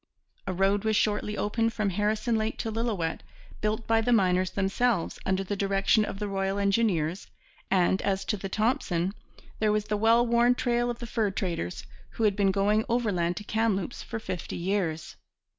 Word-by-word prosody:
A 190 - -1
road 195 +2 +2
was 220 -1 +1
shortly 210 0 0
opened 225 +2 0
from 210 -2 0
Harrison 215 +4 0
Lake 220 0 -1
to 225 - -3
Lillooet, 215 -8 -2 0.4
built 215 +2 -1
by 225 0 +3
the 245 - 0
miners 185 -4 +3
themselves, 200 0 0
under 190 0 +1
the 205 +2 -3
direction 195 +2 +2
of 195 - -6
the 210 0 -3
Royal 195 0 -1
Engineers; 200 -4 +1 0.4
and, 190 0 +2
as 195 -1 -1
to - - 0
the 195 -1 -6
Thompson, 195 -5 0 0.5
there 215 -1 +2
was 210 0 0
the 210 0 -1
well 230 +3 +4
worn 240 +1 +3
trail 240 -1 0
of 240 - -3
the 240 - -7
fur 220 -2 0
traders, 175 - -3 0.3
who 225 - 0
had 205 -2 +3
been 200 -1 +2
going 205 +3 +2
overland 195 -8 0
to 210 - -5
Kamloops 215 -2 -1
for 230 - -5
fifty 185 -6 -5
years. 175 -3 -2
205 Hz, 180 wpm, -27 LUFS, 190-225 Hz, 0.5 s, well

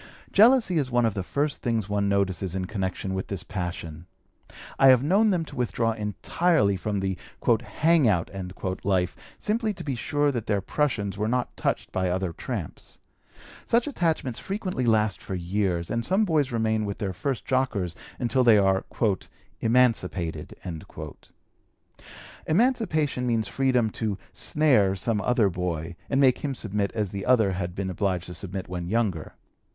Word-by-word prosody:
Jealousy 220 -5 +5
is 135 -3 -1
one 120 -1 +2
of 110 - +1
the 100 - -2
first 145 +9 -1
things 115 -4 0
one 100 -1 0
notices 95 -2 0
in 95 -1 -1
connection 95 -1 -3
with 95 0 -3
this 100 -2 -4
passion. 90 -3 -5 0.7
I 135 - +7
have 130 -1 +7
known 200 +8 +4
them 175 -5 +1
to - - -11
withdraw 115 -2 0
entirely 105 - +1
from 100 +1 -2
the 95 -1 -2 0.3
"hang 140 +6 +3
out" 90 -6 +1 0.5
life 95 -2 +1 0.2
simply 215 0 -1
to - - -7
be 140 - -2
sure 145 +4 +1
that 120 -5 -4
their 105 -2 +2
prushuns 100 -2 -1
were 105 +1 0
not 125 +2 -1
touched - - -2
by 95 -1 0
other 90 -1 -1
tramps. - - -6 0.7
Such 235 +1 +2
attachments 160 - -1
frequently 190 - -3
last 110 -2 +2
for 95 - -5
years, 90 -1 -1
and 115 0 0
some 195 - +2
boys 150 -7 +1
remain 110 -2 +1
with 100 -1 -3
their 95 -2 -3
first 130 +7 -3
jockers 115 - 0 0.2
until 125 +1 +1
they 115 -3 +7
are 95 -1 +3 0.8
"emancipated." 100 -10 +1 1.9
Emancipation 160 - +1
means 115 -3 +1
freedom 125 -4 +1
to 105 -3 -2 0.2
"snare" 125 -11 +3
some 105 +2 -1
other 120 -1 +3
boy, 90 -2 -3
and 135 - +1
make 130 -3 +4
him 140 -2 -3
submit 105 -3 -2
as 105 -4 -1
the 100 -1 -4
other 115 -6 +4
had 90 -1 -3
been 95 -1 -2
obliged 90 -2 -1
to 90 - -8
submit 95 +3 -4
when 90 -1 -4
younger. 100 -6 -1
110 Hz, 160 wpm, -26 LUFS, 95-135 Hz, 1.9 s, I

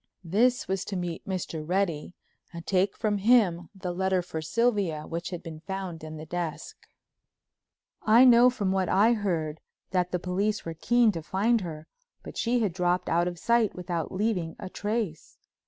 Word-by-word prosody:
This 235 +9 +2
was 190 0 -1
to 200 - -5
meet 175 -2 -4
Mr. 175 -4 -3
Reddy 175 -1 -1 0.4
and 170 -2 -8
take 190 +1 +1
from 210 -2 0
him 195 -6 +3
the 185 -2 -4
letter 190 0 +1
for 160 -2 -5
Sylvia 195 -5 0
which 170 +1 -4
had 175 -2 -6
been 160 -2 -8
found 185 -2 -6
in 155 0 -7
the 155 - -8
desk. 170 -1 -4 1.3
I 230 +4 +6
know 245 0 +7
from 205 -6 -1
what 190 -1 0
I 210 +5 +5
heard 165 -8 -2 0.3
that 180 -2 +1
the 180 - +1
police 195 +4 -1
were 165 - -4
keen 235 +7 +3
to 165 -4 -5
find 210 +8 +1
her, 160 -3 -7 0.4
but - - -9
she 240 +1 +1
had 205 -6 0
dropped 180 0 0
out 170 +1 +2
of 175 -1 -4
sight 235 +3 +2
without 175 -3 -3
leaving 185 -5 -1
a 185 - -7
trace. 205 -5 -3
185 Hz, 175 wpm, -27 LUFS, 170-210 Hz, 1.3 s, know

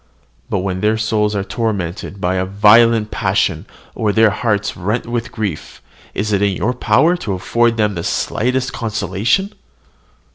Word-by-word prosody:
But - - -1
when 95 -1 -3
their 110 +1 +2
souls 105 -1 0
are 100 - -1
tormented 100 -4 -3
by 90 0 0
a 95 - 0
violent 105 +2 +4
passion, 95 -3 0 0.3
or 110 -3 0
their 110 0 +4
hearts 105 0 -1
rent 105 +7 -2
with 115 -1 -3
grief, 105 -9 -5 0.4
is 105 +1 -1
it 100 - +1
in 100 -2 +1
your 120 +8 0
power 125 +8 +3
to 105 - -4
afford 115 +5 +1
them 105 -2 +1
the 85 -3 -4
slightest 125 +8 -1
consolation? 115 - -1
105 Hz, 155 wpm, -17 LUFS, 95-115 Hz, 0.4 s, violent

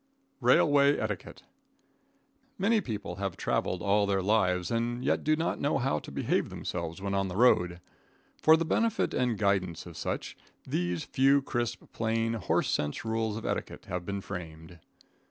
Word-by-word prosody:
Railway 145 -1 +5
Etiquette. - - -5 1.1
Many 215 +3 +2
people 110 - -5
have 95 -2 -3
traveled 90 -1 -1
all 100 0 +3
their 95 -1 +1
lives 90 -3 +2
and 120 +1 -1
yet - - +1
do 155 +1 +3
not 160 +2 -2
know 145 - +1
how 120 - 0
to - - -11
behave - - 0
themselves 85 -1 -5
when 100 0 -3
on 95 0 +1
the 90 - -6
road. 90 -7 +3 0.6
For 160 +1 +7
the 165 - -1
benefit 225 +6 +1
and 125 -3 +1
guidance 95 -5 0
of 85 -2 -10
such, - - -4 0.3
these 90 -1 -1
few 135 +1 +3
crisp, 120 -3 -2
plain, 115 0 0
horse 110 -5 0
sense 75 +8 -2
rules 110 -1 -1
of 115 - -7
etiquette - - -4
have 90 0 -4
been 100 +2 -4
framed. 80 -3 -8
105 Hz, 160 wpm, -29 LUFS, 90-125 Hz, 1.1 s, For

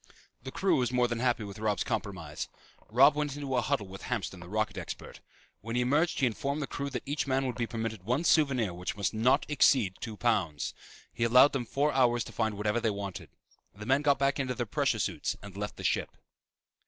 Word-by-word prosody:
The 130 +2 -7
crew 190 +7 +2
was 125 -2 0
more 125 -1 +3
than 120 -1 -3
happy 120 -2 +1
with 100 0 -8
Robb's 105 -2 0
compromise. - - -4 0.4
Robb 135 +7 +6
went 145 -2 -2
into 140 -2 -3
a 125 - +3
huddle 105 -2 0
with 95 0 -10
Hamston, 110 -6 -3
the 85 0 -11
rocket 110 +2 -1
expert. - - -7 0.4
When 115 +3 -5
he 125 - +2
emerged 150 +7 +2
he - - +5
informed 140 +5 -1
the 145 - -1
crew 140 +1 -4
that - - -4
each 145 +1 -2
man 135 0 +1
would 125 - -1
be 120 -1 -2
permitted 110 -3 -4
one 125 - 0
souvenir 135 - +3
which 90 +3 -5
must 100 -1 -1
not 125 +6 +3
exceed 130 -9 +4
two 110 -3 -6
pounds. 95 -12 0 0.4
He - - -2
allowed 125 +5 +6
them 125 -4 -2
four 145 +5 +1
hours 120 -2 +3
to - - -10
find 110 -3 -1
whatever 105 +2 0
they 115 -1 +1
wanted. 100 -2 -5 0.5
The 105 +1 -8
men 135 +4 +3
got 145 -1 +3
back 140 +1 +1
into 130 -2 -1
their 120 - -2
pressure 105 - 0
suits - - -2
and 100 -2 -10
left 105 +1 -5
the - - -8
ship. - - +1
120 Hz, 220 wpm, -30 LUFS, 105-135 Hz, 0.5 s, Robb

